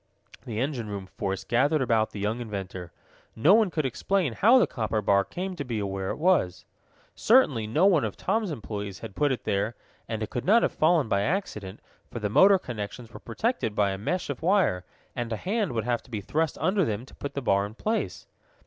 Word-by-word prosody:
The 110 -2 -3
engine 125 -4 -2
room 100 -2 -5
force 95 +1 -4
gathered 135 +7 +2
about 110 -3 +2
the 105 - -8
young 105 +4 -1
inventor. 95 -6 -6 0.4
No 150 - +5
one 220 -2 +4
could 155 -4 -2
explain 160 +3 0
how 230 - +5
the 250 - +5
copper 110 -2 -2
bar 100 -1 +3
came 185 - -5
to 145 - -4
be 120 -5 -3
where 95 -1 -3
it - - -2
was. 155 - +1 0.5
Certainly 150 - +3
no 155 - +2
one 180 -7 +4
of 110 -3 -3
Tom's 215 +1 0
employees 105 - -5
had 95 - -8
put 145 -1 +2
it 130 - -3
there, 105 +4 -1 0.3
and 110 -1 -3
it 105 - -6
could 125 - -3
not 225 +5 +4
have - - +2
fallen 160 -4 +2
by 100 -2 +1
accident, 105 - -3 0.3
for - - -7
the 105 -3 -2
motor 190 - +6
connections 115 - -7
were - - -9
protected 120 - -2
by 100 -2 +2
a 95 - -3
mesh 175 - -2
of 140 - -7
wire, 175 - +2 0.3
and 120 -1 -3
a 110 - -1
hand 205 - -1
would 115 -2 -1
have 120 -1 0
to - - -21
be 110 -4 -3
thrust 155 +10 -1
under 190 +5 +2
them 110 -3 -2
to - - -17
put 140 0 -7
the - - 0
bar 100 -3 +2
in 105 - -13
place. 110 - -2
120 Hz, 220 wpm, -27 LUFS, 105-175 Hz, 0.5 s, motor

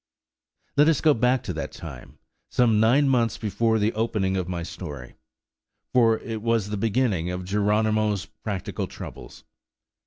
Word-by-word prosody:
Let 145 +1 +6
us 160 - +2
go 155 -2 +5
back 125 +1 +2
to 90 - -4
that 80 - -4
time, 70 -7 -10 0.3
some 115 -4 +3
nine 125 +6 +4
months 120 -4 +2
before 110 +2 +1
the 105 +1 +1
opening 105 -4 0
of 90 -1 -2
my 85 -2 -3
story, 65 -6 -8 0.8
for 115 -3 +4
it 110 -1 -6
was 115 -3 0
the 105 - -2
beginning 105 -5 0
of 90 0 -4
Geronimo's 105 +1 +1
practical 105 -2 -5
troubles. - - -10
110 Hz, 150 wpm, -25 LUFS, 95-115 Hz, 0.8 s, Let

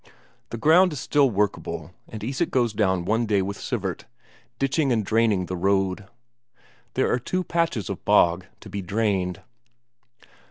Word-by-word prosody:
The 115 - -5
ground 165 +8 +5
is 145 - -5
still 140 +1 +3
workable, 95 -6 -2 0.2
and 110 -2 -8
Isak 130 +4 -1
goes 120 -4 +1
down 95 -4 +1
one 115 +4 +1
day 100 -3 +2
with 100 +1 -5
Sivert, 100 -8 -3 0.5
ditching 135 +1 +1
and 110 -4 +1
draining 110 -4 +2
the 90 - -4
road. 95 +1 0 0.9
There - - +2
are 125 - +1
two 185 +9 -2
patches 165 - -1
of - - -5
bog 90 +2 +3
to - - -11
be 100 - -3
drained. 95 -2 -1
105 Hz, 155 wpm, -24 LUFS, 95-125 Hz, 0.9 s, ground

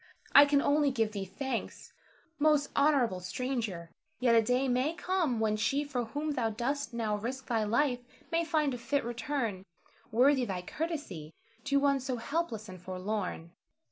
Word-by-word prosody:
I 285 - +10
can 285 -1 +2
only 290 0 +3
give 225 -5 0
thee 200 -2 -4
thanks, 235 +6 -5 0.5
most 295 -1 +2
noble 275 -10 +3
stranger; 190 -3 -3 0.3
yet 245 -2 +3
a 230 - +6
day 250 +4 +1
may 260 +6 +1
come 355 -9 0
when 215 -1 +1
she 270 +7 +1
for 260 -5 -2
whom 295 +6 -3
thou 245 -5 0
dost 250 +4 -2
now 225 -3 -1
risk 250 +5 -5
thy 225 -3 0
life 245 +3 +1 0.3
may 335 0 +2
find 300 -3 +1
a 245 - -5
fit 280 +4 0
return, 235 -4 -2 0.5
worthy 260 +4 +4
thy 190 -6 -3
courtesy 295 - -5 0.3
to 280 -1 +3
one 280 -1 +3
so 260 0 -3
helpless 235 -4 -3
and 185 -2 -10
forlorn. 185 -2 -4
250 Hz, 165 wpm, -31 LUFS, 215-285 Hz, 0.5 s, I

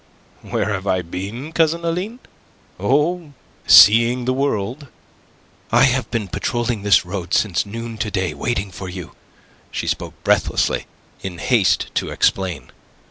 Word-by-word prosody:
"Where 100 - -2
have 95 0 -4
I 95 -2 +1
been, 100 - -6
Cousin 165 +1 +1
Aline? 180 +8 -2 0.6
Oh... 150 - 0 0.3
seeing 115 +4 +7
the 130 - +1
world." 135 0 -2 0.8
"I 120 +3 +5
have 130 -1 +2
been 115 -4 -2
patrolling 120 +3 -2
this 100 -3 +4
road 90 -1 -3
since 100 -2 +1
noon 115 +1 -7
to 105 +1 -1
day 95 -5 -2
waiting 100 +4 -2
for 95 +1 -7
you." 90 -2 -8 0.6
She - - -4
spoke - - -3
breathlessly, - - +1 0.3
in 95 -2 -6
haste 110 +1 +1
to - - -1
explain. 90 -9 -1
110 Hz, 135 wpm, -20 LUFS, 95-130 Hz, 0.8 s, seeing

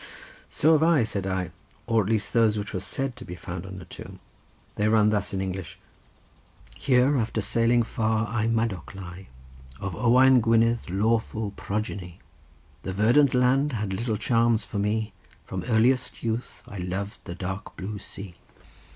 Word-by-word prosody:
"So 155 - +3
have 155 - +4
I," 160 -5 +4
said 100 -3 -2
I; 95 -2 -2 0.3
"or 115 -1 +3
at 100 - -3
least 110 -2 0
those 110 -2 +3
which 105 0 -5
were 95 - -1
said 135 +6 -2
to - - -8
be 90 - -7
found 90 +1 -7
on 95 0 -8
a 90 - -10
tomb: - - -10 0.5
they 105 - 0
run 110 -1 +4
thus 105 -2 0
in 95 - -2
English:— 95 -2 -5 1.0
"'Here, 130 - +3
after 110 0 -1
sailing 115 +3 +2
far, 110 0 0
I, 110 0 -1
Madoc, 115 -6 -1
lie, 95 0 -9 0.5
Of 100 -4 -4
Owain 125 +4 +5
Gwynedd 115 -1 +2
lawful 110 +2 0
progeny: 100 -4 -4 0.6
The 95 - -4
verdant 120 +7 +4
land 130 +3 +3
had 105 -4 -2
little 110 +2 -1
charms 115 0 +2
for 105 - -4
me; 105 +1 -1 0.3
From 95 -1 -5
earliest 125 +2 +2
youth 115 +1 -3
I 100 - -8
loved 95 +3 -4
the 85 - -6
dark 95 +2 -6
blue 100 +2 -5
sea. 100 -2 -8
110 Hz, 165 wpm, -26 LUFS, 95-115 Hz, 1.0 s, Owain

